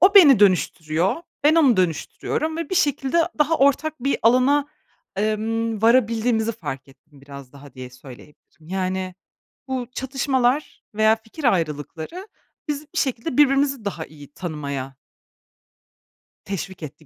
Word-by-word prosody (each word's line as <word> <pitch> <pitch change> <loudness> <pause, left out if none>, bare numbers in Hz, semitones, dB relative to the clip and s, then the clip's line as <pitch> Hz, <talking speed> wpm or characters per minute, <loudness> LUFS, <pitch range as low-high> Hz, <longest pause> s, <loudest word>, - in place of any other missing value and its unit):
o 390 +3 +6
beni 290 - +9
dönüştürüyor, 175 -2 +2 0.3
ben 310 +2 +6
onu 275 -10 +5
dönüştürüyorum 185 - -1
ve 335 +3 -5
bir - - -1
şekilde 290 -3 +1 0.2
daha 305 +2 +3
ortak 280 +2 +1
bir 275 - +1
alana, 255 +5 +4 0.5
emm, 220 +1 -1
varabildiğimizi 230 -1 +2
fark 135 - -7
ettim 145 +1 -21
biraz 140 -2 -12
daha 140 -1 -14
diye 130 -1 -9
söyleyebilirim. 145 +5 -16
Yani, 185 0 -2 0.5
bu 255 -2 -2
çatışmalar 265 +1 -1
veya 220 +1 +4
fikir 225 +7 -12
ayrılıkları 165 - -2 0.4
bizi 295 0 -3
bir - - -1
şekilde 255 -1 -2
birbirimizi 275 -4 +3
daha 175 -5 -4
iyi 145 -2 -15
tanımaya 140 -6 -5 1.5
teşvik 190 -2 -6
etti 155 +1 -10
220 Hz, 125 wpm, -22 LUFS, -, 1.5 s, beni